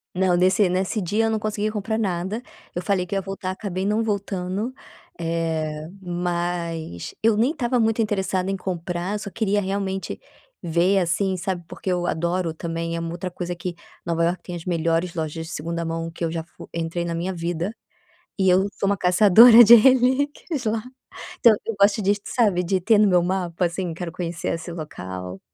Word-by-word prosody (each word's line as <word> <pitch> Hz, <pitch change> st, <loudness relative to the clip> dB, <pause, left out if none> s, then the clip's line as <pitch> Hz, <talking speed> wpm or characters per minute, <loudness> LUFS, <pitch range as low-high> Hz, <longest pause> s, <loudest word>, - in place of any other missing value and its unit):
Não, 185 Hz, -1 st, +2 dB
nesse 185 Hz, +2 st, +3 dB
nesse 185 Hz, +4 st, -1 dB
dia 205 Hz, +5 st, 0 dB
eu 225 Hz, -, +2 dB
não 220 Hz, -, 0 dB
consegui 215 Hz, 0 st, -2 dB
comprar 215 Hz, +1 st, -2 dB
nada, 190 Hz, +2 st, -2 dB, 0.3 s
eu 175 Hz, -, -3 dB
falei 185 Hz, -1 st, 0 dB
que 185 Hz, -, -4 dB
ia 195 Hz, -, 0 dB
voltar, 195 Hz, -1 st, -5 dB
acabei 190 Hz, -1 st, -4 dB
não 210 Hz, +2 st, +1 dB
voltando, 200 Hz, +2 st, -2 dB, 0.4 s
eh 160 Hz, -2 st, -2 dB
mas 175 Hz, -, -3 dB
eu 225 Hz, 0 st, +4 dB
nem 235 Hz, +7 st, +2 dB
estava 250 Hz, -5 st, 0 dB
muito 225 Hz, 0 st, +2 dB
interessada 190 Hz, -3 st, -1 dB
em 195 Hz, -, -1 dB
comprar 180 Hz, +2 st, -3 dB
só 200 Hz, -, -7 dB
queria 205 Hz, -1 st, 0 dB
realmente 195 Hz, 0 st, -3 dB, 0.4 s
ver 175 Hz, +3 st, +2 dB
assim, 185 Hz, +2 st, 0 dB
sabe. 175 Hz, -1 st, -3 dB
Porque 185 Hz, -, -5 dB
eu 175 Hz, -1 st, 0 dB
adoro 170 Hz, +1 st, -1 dB
também 165 Hz, +1 st, -4 dB
é 165 Hz, -, -2 dB
uma 165 Hz, 0 st, -4 dB
outra 175 Hz, +2 st, -5 dB
coisa 175 Hz, 0 st, -4 dB
que 175 Hz, 0 st, -5 dB, 0.3 s
Nova 170 Hz, -1 st, 0 dB
Iorque 175 Hz, +1 st, -1 dB
tem 180 Hz, -, -7 dB
as 170 Hz, 0 st, -7 dB
melhores 165 Hz, 0 st, 0 dB
lojas 160 Hz, 0 st, -4 dB
de 165 Hz, -, -8 dB
segunda 170 Hz, +2 st, -3 dB
mão 165 Hz, 0 st, -3 dB
que 165 Hz, +1 st, -5 dB
eu -, -, -2 dB
já 165 Hz, 0 st, -3 dB
fu 170 Hz, -, -14 dB
entrei 170 Hz, +1 st, -2 dB
na 170 Hz, -, -3 dB
minha 175 Hz, +3 st, -2 dB
vida, 175 Hz, +3 st, -3 dB, 0.6 s
e 190 Hz, -1 st, +4 dB
eu 185 Hz, +2 st, +4 dB
sou -, -, 0 dB
uma 200 Hz, -, +2 dB
caçadora 215 Hz, +6 st, +8 dB
de 230 Hz, +2 st, +10 dB
relíquias 260 Hz, +4 st, +3 dB
lá. 220 Hz, 0 st, 0 dB, 0.6 s
Então 230 Hz, -, +7 dB
eu 230 Hz, -, -2 dB
gosto 200 Hz, +1 st, +4 dB
disso, 200 Hz, +1 st, +1 dB
sabe, 205 Hz, -7 st, +2 dB
de 185 Hz, +1 st, 0 dB
ter 220 Hz, +3 st, +4 dB
no 210 Hz, 0 st, +5 dB
meu 180 Hz, -2 st, +4 dB
mapa, 180 Hz, -1 st, -1 dB
assim, 175 Hz, 0 st, -3 dB
quero 170 Hz, 0 st, -5 dB
conhecer 170 Hz, 0 st, -4 dB
esse 165 Hz, +1 st, -7 dB
local. 95 Hz, -, -7 dB
180 Hz, 190 wpm, -23 LUFS, 170-205 Hz, 0.6 s, de